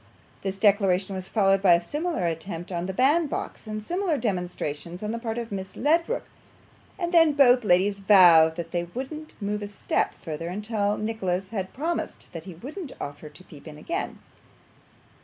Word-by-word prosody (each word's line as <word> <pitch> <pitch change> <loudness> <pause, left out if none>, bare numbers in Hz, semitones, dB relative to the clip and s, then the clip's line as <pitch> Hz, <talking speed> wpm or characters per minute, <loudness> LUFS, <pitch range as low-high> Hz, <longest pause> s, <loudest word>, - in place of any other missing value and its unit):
This 195 0 -3
declaration 195 -2 +3
was 185 -1 -5
followed 195 -3 +3
by 180 -3 +7
a - - +2
similar 295 - -2
attempt 170 +2 -4
on 175 0 -2
the - - -2
bandbox, 280 - 0
and 215 0 -4
similar 350 - 0
demonstrations 180 - -3
on 210 - -2
the 230 - -3
part 230 -1 -4
of 235 -2 -4
Miss 190 -1 -5
Ledrook, 335 - +1 0.7
and 345 -1 -3
then 325 -3 +6
both 255 -3 +5
ladies 200 +1 +3
vowed 175 -5 +7
that 170 -1 -6
they 175 0 -1
wouldn't 305 +5 -6
move 210 0 -2
a 205 - -4
step 205 - -1
further 165 0 -6
until 205 +2 -1
Nicholas 195 -3 -2
had 190 -4 -3
promised 330 +5 -4
that 165 -1 -7
he 185 -3 -9
wouldn't 280 - -8
offer 145 +2 -7
to 150 +5 -16
peep 155 -4 -14
again. 155 - -4
200 Hz, 170 wpm, -26 LUFS, 180-245 Hz, 0.7 s, by